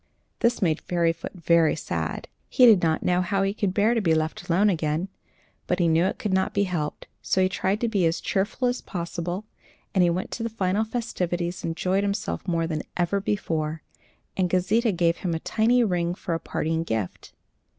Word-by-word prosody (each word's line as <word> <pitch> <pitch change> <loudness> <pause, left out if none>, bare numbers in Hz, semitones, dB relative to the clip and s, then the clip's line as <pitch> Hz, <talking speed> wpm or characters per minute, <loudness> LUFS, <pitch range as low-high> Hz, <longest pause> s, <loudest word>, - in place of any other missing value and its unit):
This 235 -3 +2
made 160 -3 +1
Fairyfoot 170 -1 -1
very 170 -2 +3
sad. - - -4 0.2
He 255 - +5
did 215 -6 +7
not 160 -1 +1
know 180 0 +2
how 195 +2 0
he 195 0 0
could 205 -3 -1
bear 210 +4 +3
to 230 - +1
be 165 -5 +3
left 160 +2 -2
alone 190 +5 +4
again, 165 -1 0 0.6
but 180 - +1
he 175 -2 +2
knew 165 +2 +3
it 190 - -1
could 210 -3 -2
not 190 0 +1
be 200 - +3
helped; 170 -6 -3 0.2
so - - 0
he 185 - +4
tried 190 +2 -1
to 235 - +2
be 200 -6 +2
as 165 - 0
cheerful 210 +6 -1
as 245 +1 -1
possible, 175 +2 -4 0.5
and 190 -3 +4
he 175 - +4
went 180 +2 -2
to 235 - -5
the 230 - -1
final 205 -1 0
festivities, 180 -7 -3
and - - -1
enjoyed 185 +4 0
himself 200 0 -2
more 165 -2 +1
than 155 -2 -2 0.2
ever 180 +3 +1
before, 160 -6 -2 0.5
and 185 -2 +1
Gauzita 210 +6 +2
gave 170 -2 +1
him 175 -3 -2
a - - -2
tiny 235 +7 +2
ring 175 -4 0
for 175 - -4
a 165 - -1
parting 160 0 -2
gift. 110 - -4
180 Hz, 200 wpm, -25 LUFS, 165-200 Hz, 0.6 s, did